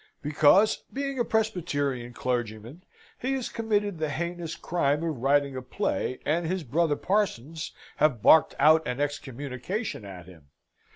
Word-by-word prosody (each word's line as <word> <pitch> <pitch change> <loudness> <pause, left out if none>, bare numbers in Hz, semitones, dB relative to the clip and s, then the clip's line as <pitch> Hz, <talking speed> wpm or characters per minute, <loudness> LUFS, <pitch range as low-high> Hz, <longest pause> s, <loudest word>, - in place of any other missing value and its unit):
"Because, 150 +8 +4
being 275 -1 -3
a - - +3
Presbyterian 150 - -1
clergyman, 120 - -3 0.4
he 260 +2 -1
has 260 -3 -2
committed 210 -5 -1
the 155 -1 -1
heinous 170 +3 -4
crime 150 -3 0
of 160 -4 -2
writing 140 +2 +2
a 130 - -4
play, 130 -1 -2
and 165 +2 +1
his 185 0 -2
brother 150 +3 +1
parsons 165 - -1 0.3
have 145 -7 +3
barked 155 +7 +6
out 155 +3 +6
an 125 +1 -3
excommunication 145 - -4
at 95 -4 -9
him. 85 -5 -16
150 Hz, 140 wpm, -27 LUFS, 130-185 Hz, 0.4 s, barked